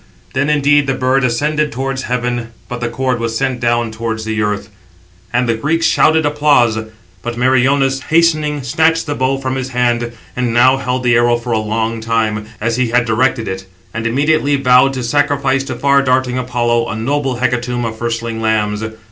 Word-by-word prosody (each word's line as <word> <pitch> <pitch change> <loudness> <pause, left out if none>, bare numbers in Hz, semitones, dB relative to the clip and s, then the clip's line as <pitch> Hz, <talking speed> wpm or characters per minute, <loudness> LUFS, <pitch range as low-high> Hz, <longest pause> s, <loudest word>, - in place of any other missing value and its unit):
Then 140 +3 0
indeed 145 -1 +3
the 135 - 0
bird 130 +1 +1
ascended 150 +5 0
towards 135 +2 -3
heaven, 120 -2 -2 0.2
but 125 0 -6
the 120 - -1
cord 130 0 -1
was 115 -1 -2
sent 130 -1 -1
down 120 -1 0
towards 110 0 -4
the 110 0 -2
earth: 105 -1 -2 0.6
and 120 +1 +1
the 115 - +2
Greeks 155 +8 0
shouted 160 0 +3
applause. 145 -6 +3 0.5
But 120 +3 -5
Meriones, 135 +2 +2
hastening, 155 -3 +2
snatched 160 +6 +1
the 145 - -2
bow 130 0 0
from 130 -1 -3
his 130 -1 -3
hand; 120 -1 0 0.2
and 125 -2 -1
now 130 +2 +5
held 125 -1 -2
the 120 -1 +3
arrow 120 0 +3
for 120 +1 -6
a 110 - +2
long 110 +1 -2
time, 110 -2 -1
as 115 +2 -1
he 130 -1 +1
had 120 0 +2
directed 115 0 0
it; 95 0 -5 0.3
and 115 +1 -2
immediately 145 +3 +2
vowed 135 0 +4
to 130 -2 -4
sacrifice 140 +1 +1
to - - -4
far 140 0 +3
darting 130 -1 +1
Apollo 120 -2 0
a - - -3
noble 135 +3 -1
hecatomb 120 0 -1
of 110 -1 -5
firstling 115 -1 -3
lambs. 105 -1 0
125 Hz, 185 wpm, -16 LUFS, 115-135 Hz, 0.6 s, now